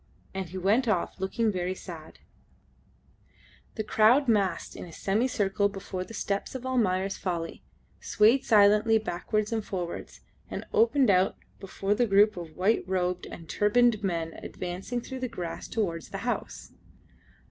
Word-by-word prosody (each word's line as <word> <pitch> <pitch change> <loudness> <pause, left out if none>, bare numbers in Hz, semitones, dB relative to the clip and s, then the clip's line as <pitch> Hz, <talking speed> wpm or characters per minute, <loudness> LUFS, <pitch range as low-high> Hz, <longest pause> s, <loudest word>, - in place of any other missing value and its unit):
And 190 -2 -4
he 185 - -7
went 210 +7 +2
off 195 -3 0
looking 215 +4 0
very 185 -1 -2
sad. 165 -4 -10 1.6
The 220 - -2
crowd 225 +6 +4
massed 200 -7 +1
in - - -7
a 170 - -12
semicircle 200 0 0
before 195 -2 -5
the 225 - -10
steps 200 +5 -3
of 260 -1 -5
"Almayer's 195 -7 0
Folly," 170 -3 -3 0.4
swayed 225 +6 +3
silently 210 +1 +5
backwards 215 +1 -2
and 220 -1 -1
forwards, 180 -4 -5 0.3
and - - -5
opened 240 0 +4
out 185 0 +2 0.2
before 195 +1 -2
the 240 +3 +1
group 205 +1 +5
of 165 -3 -8
white 200 +5 +2
robed 180 -1 -1
and 165 - -10
turbaned 215 +2 +3
men 165 -4 -2
advancing 185 +7 -5
through 260 +2 -7
the 255 - -2
grass 175 -8 -6
towards 170 - -2
the - - -5
house. - - -4
200 Hz, 145 wpm, -28 LUFS, 180-225 Hz, 1.6 s, silently